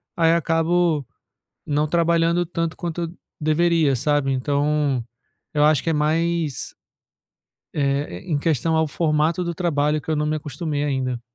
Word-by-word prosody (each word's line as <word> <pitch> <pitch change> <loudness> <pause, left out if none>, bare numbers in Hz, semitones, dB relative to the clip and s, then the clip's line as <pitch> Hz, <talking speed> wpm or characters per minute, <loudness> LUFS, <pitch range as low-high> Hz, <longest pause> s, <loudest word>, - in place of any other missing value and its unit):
aí 165 -3 +4
acabo 165 -2 +1 0.6
não 150 +1 0
trabalhando 170 +1 +2
tanto 165 -1 -3
quanto 170 -1 -3 0.3
deveria, 155 -1 +2
sabe? 140 +1 +1
Então, 140 -1 0 0.5
eu 150 - +3
acho 150 -3 +4
que 165 - 0
é - - +2
mais, 160 0 0 1.0
eh, 140 -10 -1
em 150 - -2
questão 160 +1 +1
ao 160 0 +2
formato 155 +3 +1
do 170 - -2
trabalho 150 -3 0
que 160 - -7
eu - - 0
não 150 0 0
me 155 +1 0
acostumei 145 0 -3
ainda. 130 -4 -1
155 Hz, 145 wpm, -22 LUFS, 145-165 Hz, 1.0 s, aí